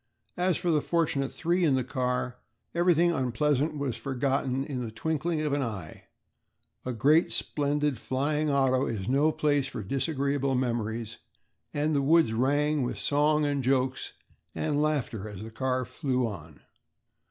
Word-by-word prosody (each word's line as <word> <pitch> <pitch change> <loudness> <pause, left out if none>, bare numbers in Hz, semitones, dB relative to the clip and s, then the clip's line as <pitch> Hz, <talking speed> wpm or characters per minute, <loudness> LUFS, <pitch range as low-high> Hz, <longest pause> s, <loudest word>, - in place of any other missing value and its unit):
As 180 -1 +2
for 175 -2 0
the 150 -2 +3
fortunate 150 -5 0
three 175 +2 0
in 145 -5 +4
the 130 - +1
car, 125 -1 -2 0.3
everything 175 0 +3
unpleasant 145 +2 0
was 140 -5 -2
forgotten 135 +2 -1
in 135 -3 -4
the 120 - -4
twinkling 160 +7 -1
of 150 -2 -1
an 145 - +1
eye. 105 -10 -6 0.8
A 130 - -3
great 145 +8 +3
splendid 145 -3 0
flying 150 +5 0
auto 135 -2 +2
is 105 -4 -3
no 140 +4 +3
place 145 -3 +1
for 110 - -6
disagreeable 140 - 0
memories, 115 -2 -2 0.5
and 150 +1 0
the 140 - +2
woods 155 -4 +4
rang 145 +5 +2
with 125 - -2
song 150 +1 +2
and 140 -2 0
jokes 130 0 0 0.4
and 150 -2 0
laughter 130 -9 -1
as 105 -1 -8
the 110 - -8
car 130 +1 -1
flew 130 0 -1
on. 80 -9 -8
135 Hz, 155 wpm, -28 LUFS, 125-150 Hz, 0.8 s, in